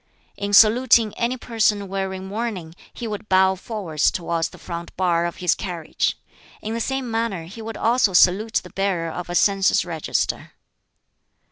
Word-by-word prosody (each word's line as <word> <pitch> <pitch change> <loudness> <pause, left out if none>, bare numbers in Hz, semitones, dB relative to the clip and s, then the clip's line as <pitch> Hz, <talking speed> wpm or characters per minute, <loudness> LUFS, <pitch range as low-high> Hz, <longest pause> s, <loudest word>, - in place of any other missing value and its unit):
In 200 0 -4
saluting 225 +1 +5
any 240 +2 -1
person 215 -4 0
wearing 190 0 -4
mourning 200 -5 -4 0.2
he 240 - -7
would 210 0 -6
bow 190 0 +4
forwards 185 -6 -1
towards 170 -2 -2
the - - -14
front 170 0 -8
bar 175 -2 +1
of 170 - -6
his 180 -1 +1
carriage; 170 -4 -3 0.4
in 220 - -5
the 230 - -2
same 265 -1 -2
manner 225 -6 -2
he 195 +8 -10
would 220 0 -6
also 230 -3 +2
salute 200 +5 +4
the 180 - -12
bearer 185 -4 -1
of 175 +2 -6
a 175 - -3
census 195 0 +3
register. 165 -3 -2
195 Hz, 160 wpm, -22 LUFS, 175-225 Hz, 0.4 s, saluting